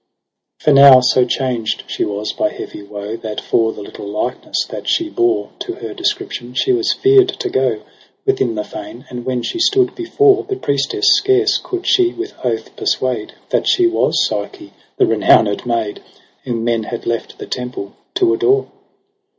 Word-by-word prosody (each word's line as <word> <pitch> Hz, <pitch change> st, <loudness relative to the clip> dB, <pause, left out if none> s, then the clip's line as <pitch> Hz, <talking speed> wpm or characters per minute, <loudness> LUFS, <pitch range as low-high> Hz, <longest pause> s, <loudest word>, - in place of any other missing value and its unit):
16 -, -, -19 dB
For 150 Hz, -, +5 dB
now 135 Hz, -2 st, +10 dB
so 125 Hz, 0 st, +3 dB
changed 125 Hz, -3 st, -2 dB
she -, -, -3 dB
was 105 Hz, +1 st, -3 dB
by -, -, 0 dB
heavy -, -, -8 dB
woe, 105 Hz, +1 st, -6 dB
That 110 Hz, -2 st, -5 dB
for 115 Hz, -1 st, +1 dB
the -, -, -9 dB
little 100 Hz, -, -9 dB
likeness 105 Hz, +5 st, -2 dB
that -, -, -7 dB
she 335 Hz, -1 st, +1 dB
bore 365 Hz, +1 st, 0 dB
To 365 Hz, -, -4 dB
her -, -, -7 dB
description 125 Hz, -, -3 dB
she 390 Hz, -, +2 dB
was 365 Hz, -1 st, +1 dB
fear'd 395 Hz, 0 st, +5 dB
to -, -, -2 dB
go 130 Hz, -5 st, 0 dB, 0.4 s
Within 120 Hz, -3 st, +1 dB
the 105 Hz, -, -2 dB
fane; 115 Hz, +7 st, -9 dB
and 120 Hz, 0 st, -7 dB
when 125 Hz, -2 st, -1 dB
she 345 Hz, -, -3 dB
stood 380 Hz, 0 st, +3 dB
before 400 Hz, +3 st, +2 dB
The 395 Hz, -, -3 dB
priestess, 140 Hz, -, -1 dB
scarce 400 Hz, 0 st, +2 dB
coud 370 Hz, -1 st, -5 dB
she 365 Hz, -2 st, +3 dB
with 365 Hz, +3 st, -6 dB
oath -, -, -3 dB
persuade -, -, -1 dB, 0.2 s
That -, -, +1 dB
she 360 Hz, -, +4 dB
was 345 Hz, -, +2 dB
Psyche, 335 Hz, -5 st, -5 dB, 0.2 s
the 390 Hz, -, +4 dB
renowned 110 Hz, -, +3 dB
maid,. 115 Hz, -3 st, -2 dB, 0.4 s
Whom 120 Hz, -3 st, -2 dB
men 115 Hz, -2 st, 0 dB
had 120 Hz, -, -6 dB
left 115 Hz, -1 st, -3 dB
the -, -, -7 dB
temple 125 Hz, -5 st, -5 dB, 0.2 s
to 365 Hz, -1 st, +3 dB
adore. 400 Hz, +1 st, +1 dB
130 Hz, 175 wpm, -17 LUFS, -, 0.4 s, now